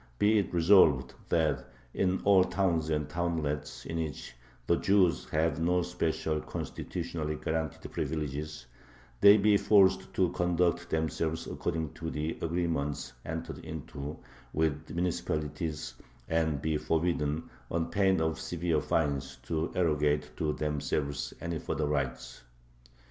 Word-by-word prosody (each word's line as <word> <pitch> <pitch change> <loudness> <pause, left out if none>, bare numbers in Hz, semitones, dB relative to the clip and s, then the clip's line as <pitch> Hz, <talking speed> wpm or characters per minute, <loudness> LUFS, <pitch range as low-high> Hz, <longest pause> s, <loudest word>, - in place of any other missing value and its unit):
be 105 - +4
it 100 - -2
resolved 80 -7 +5 0.2
that 80 -3 +2 0.3
in 95 -1 +1
all 100 -2 +6
towns 85 -5 0
and 75 -2 0
townlets 75 -5 -2
in 80 - -3
which 75 -6 -4 0.3
the - - +3
Jews 90 -10 +3
have 80 +1 +1
no 90 +1 +2
special, 80 -3 -1
constitutionally 75 0 -4
guaranteed 80 0 -3
privileges, 75 0 -3 0.5
they 100 +1 +9
be 105 0 +5
forced 100 -2 +4
to 90 -2 +3
conduct 85 0 +1
themselves 80 0 -1
according 80 -3 -3
to 80 +1 -5
the 75 +1 -2
agreements 80 -4 -1
entered - - -4
into 75 -1 -6 0.4
with 80 0 0
the - - -8
municipalities, 80 -3 -2 0.3
and 80 -3 0
be 80 -1 +1
forbidden, 80 -1 0 0.2
on 85 -1 -1
pain 95 -2 +3
of 80 0 0
severe 85 -2 0
fines, 70 -4 0
to 80 0 -2
arrogate 75 -3 +1
to 75 -3 0
themselves 70 -3 -2
any 85 -2 -3
further 75 - -2
rights. 70 -4 -2
80 Hz, 125 wpm, -30 LUFS, 75-85 Hz, 0.5 s, they